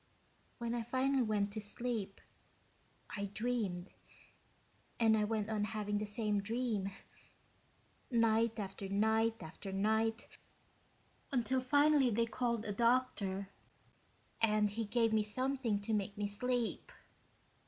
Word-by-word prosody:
When 235 Hz, -1 st, -3 dB
I 240 Hz, -, -1 dB
finally 260 Hz, +3 st, +1 dB
went 210 Hz, -3 st, 0 dB
to 215 Hz, -, -2 dB
sleep, 210 Hz, -2 st, -3 dB, 0.9 s
I 200 Hz, -1 st, -2 dB
dreamed, 210 Hz, -6 st, -1 dB, 1.1 s
and 225 Hz, -1 st, +5 dB
I 210 Hz, -1 st, +2 dB
went 215 Hz, -1 st, -1 dB
on 215 Hz, -2 st, -1 dB
having 210 Hz, -1 st, -1 dB
the 210 Hz, -, -2 dB
same 210 Hz, -1 st, 0 dB
dream, 220 Hz, -2 st, -1 dB, 1.2 s
night 230 Hz, -2 st, +2 dB
after 195 Hz, -1 st, -5 dB
night 220 Hz, +1 st, +2 dB
after 175 Hz, +5 st, -7 dB
night, 220 Hz, +3 st, +1 dB, 1.0 s
until 255 Hz, 0 st, +1 dB
finally 285 Hz, 0 st, +4 dB
they 230 Hz, +1 st, +2 dB
called 235 Hz, -1 st, -1 dB
a 205 Hz, -, -2 dB
doctor 205 Hz, -4 st, +1 dB, 0.9 s
and 215 Hz, -2 st, +3 dB
he 225 Hz, +2 st, -2 dB
gave 225 Hz, +1 st, +2 dB
me 215 Hz, -, +4 dB
something 250 Hz, 0 st, 0 dB
to 220 Hz, +2 st, -2 dB
make 205 Hz, 0 st, -1 dB
me 205 Hz, -, -1 dB
sleep." 245 Hz, +3 st, -2 dB
220 Hz, 120 wpm, -35 LUFS, 205-235 Hz, 1.2 s, and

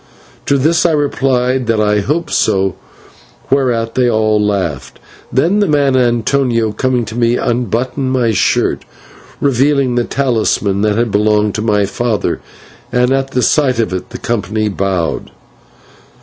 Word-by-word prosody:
To 140 Hz, -, +3 dB
this 160 Hz, +5 st, +2 dB
I 170 Hz, -, +2 dB
replied 130 Hz, -4 st, 0 dB
that 115 Hz, -1 st, +1 dB
I 105 Hz, -1 st, +2 dB
hoped 150 Hz, +11 st, -2 dB
so, 95 Hz, -3 st, +1 dB, 0.8 s
whereat 120 Hz, -4 st, +1 dB
they 125 Hz, -1 st, +2 dB
all 110 Hz, -2 st, +1 dB
laughed. 95 Hz, -10 st, -2 dB, 0.3 s
Then 165 Hz, +11 st, +2 dB
the 205 Hz, -, +2 dB
man 145 Hz, -3 st, +2 dB
Antonio, 120 Hz, -1 st, +1 dB
coming 125 Hz, +1 st, -1 dB
to 110 Hz, -, -8 dB
me, 120 Hz, 0 st, +1 dB
unbuttoned 125 Hz, +2 st, -1 dB
my 125 Hz, -3 st, +1 dB
shirt, 100 Hz, -, +1 dB, 0.6 s
revealing 140 Hz, -1 st, +2 dB
the 120 Hz, 0 st, +1 dB
talisman 110 Hz, -7 st, 0 dB
that 105 Hz, 0 st, +1 dB
had 115 Hz, -1 st, 0 dB
belonged 105 Hz, 0 st, +2 dB
to 105 Hz, -, -3 dB
my 105 Hz, -2 st, +1 dB
father, 110 Hz, +1 st, -2 dB, 0.5 s
and 125 Hz, +1 st, +2 dB
at 135 Hz, 0 st, 0 dB
the 125 Hz, -2 st, -1 dB
sight 135 Hz, -5 st, +2 dB
of 110 Hz, -6 st, -1 dB
it 90 Hz, -, -5 dB
the -, -, -7 dB
company 110 Hz, -1 st, -2 dB
bowed. 95 Hz, -4 st, -2 dB
120 Hz, 150 wpm, -14 LUFS, 105-130 Hz, 0.8 s, To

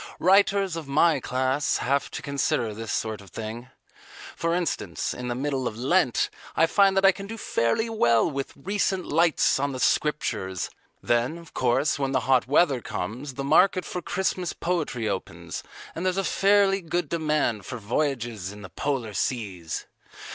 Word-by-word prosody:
Writers 195 Hz, -1 st, +3 dB
of 165 Hz, -3 st, -6 dB
my 150 Hz, +2 st, +3 dB
class 130 Hz, +3 st, 0 dB
have 140 Hz, +2 st, 0 dB
to -, -, -7 dB
consider 135 Hz, -5 st, 0 dB
this 115 Hz, +1 st, -5 dB
sort 110 Hz, -2 st, -2 dB
of 100 Hz, -, -14 dB
thing. 115 Hz, +6 st, -7 dB, 0.7 s
For 165 Hz, 0 st, 0 dB
instance, 145 Hz, -, -2 dB
in 125 Hz, -, -6 dB
the 120 Hz, -, -2 dB
middle 135 Hz, -1 st, -1 dB
of 110 Hz, -, -5 dB
Lent, 130 Hz, +1 st, +2 dB, 0.2 s
I 165 Hz, -, +5 dB
find 195 Hz, +3 st, +3 dB
that 195 Hz, -, +4 dB
I 195 Hz, -, +8 dB
can 195 Hz, +1 st, -8 dB
do 225 Hz, +2 st, -6 dB
fairly 205 Hz, -, 0 dB
well 120 Hz, -, +3 dB
with 140 Hz, -4 st, -4 dB
"Recent 190 Hz, +3 st, -1 dB
Lights 165 Hz, -3 st, +3 dB
on 140 Hz, 0 st, -1 dB
the 130 Hz, -, -5 dB
Scriptures." 95 Hz, -, 0 dB, 0.3 s
Then, 120 Hz, +7 st, +1 dB
of 170 Hz, -2 st, -14 dB
course, 130 Hz, +4 st, +1 dB
when 135 Hz, -1 st, -1 dB
the 130 Hz, -, +2 dB
hot 125 Hz, 0 st, +2 dB
weather 140 Hz, -2 st, +3 dB
comes, 125 Hz, +10 st, -5 dB
the 135 Hz, -, -3 dB
market 185 Hz, +6 st, +4 dB
for 180 Hz, -, -4 dB
Christmas 180 Hz, -1 st, -1 dB
poetry 155 Hz, -10 st, -2 dB
opens 95 Hz, -2 st, -4 dB, 0.3 s
and 165 Hz, -, -5 dB
there's 185 Hz, 0 st, 0 dB
a 195 Hz, -, +1 dB
fairly 195 Hz, +1 st, +3 dB
good 175 Hz, 0 st, -2 dB
demand 150 Hz, -, 0 dB
for 125 Hz, -, -5 dB
voyages 115 Hz, -4 st, -2 dB
in 105 Hz, 0 st, -11 dB
the 95 Hz, -, -9 dB
Polar 125 Hz, 0 st, -2 dB
Seas. 95 Hz, -8 st, -3 dB
140 Hz, 170 wpm, -26 LUFS, 120-175 Hz, 0.7 s, I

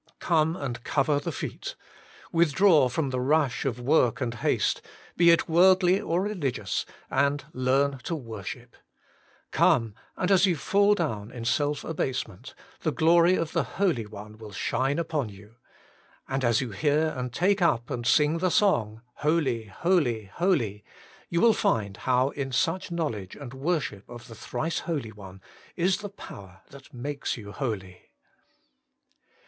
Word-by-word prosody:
Come 160 Hz, -1 st, +1 dB
and 120 Hz, -8 st, -5 dB
cover 145 Hz, -2 st, +1 dB
the -, -, -4 dB
feet: -, -, -6 dB, 0.6 s
withdraw 165 Hz, -3 st, +4 dB
from 135 Hz, +2 st, -1 dB
the 130 Hz, -, -1 dB
rush 145 Hz, 0 st, +1 dB
of 125 Hz, -3 st, -1 dB
work 130 Hz, -1 st, +2 dB
and 120 Hz, -3 st, -2 dB
haste, 115 Hz, -, 0 dB, 0.3 s
be 170 Hz, 0 st, +5 dB
it 170 Hz, -, +4 dB
worldly 185 Hz, +2 st, +5 dB
or 175 Hz, +3 st, 0 dB
religious, 140 Hz, -, -2 dB, 0.2 s
and 140 Hz, +1 st, +1 dB
learn 135 Hz, +2 st, +1 dB
to 165 Hz, -, -2 dB
worship. 115 Hz, -, -8 dB, 0.8 s
Come, 115 Hz, -4 st, +3 dB, 0.2 s
and 180 Hz, +2 st, 0 dB
as 190 Hz, 0 st, +5 dB
you 180 Hz, -, +2 dB
fall 200 Hz, +6 st, +3 dB
down 110 Hz, -, -3 dB
in 120 Hz, -2 st, -7 dB
self 145 Hz, +5 st, 0 dB
abase 135 Hz, -5 st, -2 dB
ment, 90 Hz, -, -13 dB, 0.2 s
the -, -, -1 dB
glory 170 Hz, +2 st, +4 dB
of 165 Hz, -3 st, -2 dB
the 165 Hz, -, +1 dB, 0.2 s
Holy 170 Hz, -, +1 dB
One 105 Hz, +1 st, -11 dB
will 110 Hz, -2 st, -10 dB
shine 135 Hz, +8 st, -1 dB
upon 155 Hz, -7 st, -1 dB
you. 105 Hz, +3 st, -15 dB, 0.7 s
And 135 Hz, 0 st, -2 dB
as 120 Hz, 0 st, +3 dB
you 125 Hz, -4 st, -4 dB
hear 150 Hz, +7 st, +1 dB
and 125 Hz, -1 st, -4 dB
take 190 Hz, -, +1 dB
up 120 Hz, -9 st, +1 dB
and 120 Hz, -1 st, -3 dB
sing 150 Hz, +6 st, +3 dB
the 185 Hz, +1 st, +1 dB
song, 115 Hz, -, +1 dB
HOLY, 145 Hz, -7 st, 0 dB
HOLY, 120 Hz, -, 0 dB
HOLY, 125 Hz, -, 0 dB, 0.5 s
you 170 Hz, -, 0 dB
will 230 Hz, -1 st, +6 dB
find 100 Hz, -, 0 dB
how 130 Hz, +1 st, +2 dB
in 140 Hz, -2 st, -4 dB
such 165 Hz, +9 st, 0 dB
knowledge 145 Hz, -, -3 dB
and 135 Hz, -3 st, -9 dB
worship 135 Hz, -, -2 dB
of 120 Hz, 0 st, -10 dB
the 115 Hz, -, -11 dB
Thrice 160 Hz, +8 st, -3 dB
Holy 145 Hz, -10 st, -3 dB
One 95 Hz, -2 st, -12 dB, 0.3 s
is 185 Hz, +2 st, +2 dB
the 205 Hz, -1 st, -7 dB
power 95 Hz, -, -12 dB
that 135 Hz, -1 st, -14 dB
makes 140 Hz, +3 st, -4 dB
you 100 Hz, -3 st, -9 dB
holy. 100 Hz, -8 st, -5 dB
140 Hz, 155 wpm, -27 LUFS, 115-170 Hz, 0.8 s, will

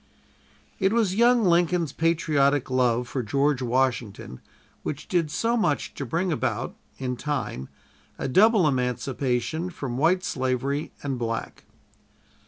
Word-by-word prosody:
It 190 Hz, +1 st, +2 dB
was 220 Hz, -5 st, +2 dB
young 235 Hz, +2 st, +4 dB
Lincoln's 170 Hz, -3 st, +2 dB
patriotic 150 Hz, -5 st, +1 dB
love 125 Hz, -1 st, +2 dB
for 130 Hz, -, -2 dB
George 135 Hz, +4 st, +1 dB
Washington 120 Hz, -, -1 dB, 0.4 s
which 150 Hz, -, -5 dB
did 170 Hz, -4 st, +1 dB
so 230 Hz, +9 st, 0 dB
much 180 Hz, -11 st, 0 dB
to 140 Hz, -, -5 dB
bring 175 Hz, +8 st, 0 dB
about, 155 Hz, -, -2 dB, 0.2 s
in 125 Hz, -1 st, -3 dB
time, 130 Hz, -, -3 dB, 0.5 s
a -, -, -3 dB
double 200 Hz, -, +5 dB
emancipation 130 Hz, +3 st, -1 dB
from 135 Hz, -7 st, -5 dB
white 180 Hz, +5 st, +3 dB
slavery 130 Hz, +1 st, -1 dB
and 135 Hz, -3 st, -2 dB
black. 115 Hz, -1 st, -4 dB
140 Hz, 125 wpm, -25 LUFS, 125-175 Hz, 0.5 s, double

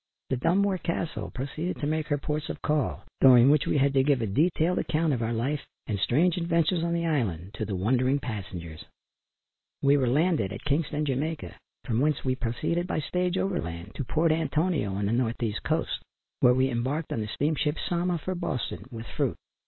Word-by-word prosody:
The 130 Hz, -, +2 dB
Dunmore 190 Hz, +7 st, +2 dB
Castle 170 Hz, -1 st, -3 dB
proceeded 155 Hz, +7 st, -4 dB
to -, -, -2 dB
make 155 Hz, +1 st, -1 dB
her 145 Hz, -, +1 dB
ports 150 Hz, +2 st, -3 dB
of -, -, -6 dB
call, 150 Hz, -2 st, 0 dB, 0.2 s
during 130 Hz, 0 st, +8 dB
which 150 Hz, -1 st, +3 dB
we -, -, +2 dB
had 140 Hz, 0 st, +3 dB
to 135 Hz, -, +4 dB
give 140 Hz, -2 st, +3 dB
a 115 Hz, -, 0 dB
detailed 160 Hz, -, +2 dB
account 155 Hz, -1 st, +1 dB
of 120 Hz, -, -1 dB
our 115 Hz, 0 st, -1 dB
life 135 Hz, +6 st, -1 dB, 0.2 s
and 100 Hz, -2 st, -2 dB
strange 160 Hz, -, +2 dB
adventures 170 Hz, 0 st, +1 dB
on 170 Hz, 0 st, 0 dB
the 170 Hz, 0 st, 0 dB
island, 105 Hz, -, -1 dB
to 110 Hz, +1 st, -3 dB
the 100 Hz, -2 st, -3 dB
wondering 125 Hz, +8 st, +2 dB
passengers. 95 Hz, -, -6 dB, 1.0 s
We 140 Hz, +1 st, +5 dB
were 130 Hz, -3 st, +1 dB
landed 150 Hz, -, +2 dB
at 100 Hz, -, -7 dB
Kingston, 150 Hz, +1 st, 0 dB
Jamaica, 150 Hz, +4 st, -2 dB, 0.3 s
from 115 Hz, -4 st, 0 dB
whence 150 Hz, +1 st, +1 dB
we 130 Hz, -, +2 dB
proceeded 150 Hz, +9 st, -1 dB
by -, -, -2 dB
stage 180 Hz, +3 st, -1 dB
over 190 Hz, -2 st, 0 dB
land 85 Hz, +4 st, -7 dB
to 140 Hz, -, -3 dB
Port 160 Hz, +5 st, +2 dB
Antonio 155 Hz, -, 0 dB
on 100 Hz, +1 st, -1 dB
the 100 Hz, -, 0 dB
north 120 Hz, 0 st, 0 dB
east 105 Hz, -3 st, -1 dB
coast, -, -, -1 dB, 0.4 s
where 125 Hz, 0 st, +5 dB
we 130 Hz, +1 st, +2 dB
embarked 130 Hz, +7 st, -2 dB
on 110 Hz, -, -1 dB
the 105 Hz, -, -3 dB
steamship 150 Hz, +5 st, 0 dB
Sama, 175 Hz, 0 st, 0 dB
for 185 Hz, +4 st, -3 dB
Boston, 155 Hz, -, -3 dB
with 115 Hz, -2 st, -7 dB
fruit. -, -, -1 dB
145 Hz, 200 wpm, -27 LUFS, 120-165 Hz, 1.0 s, during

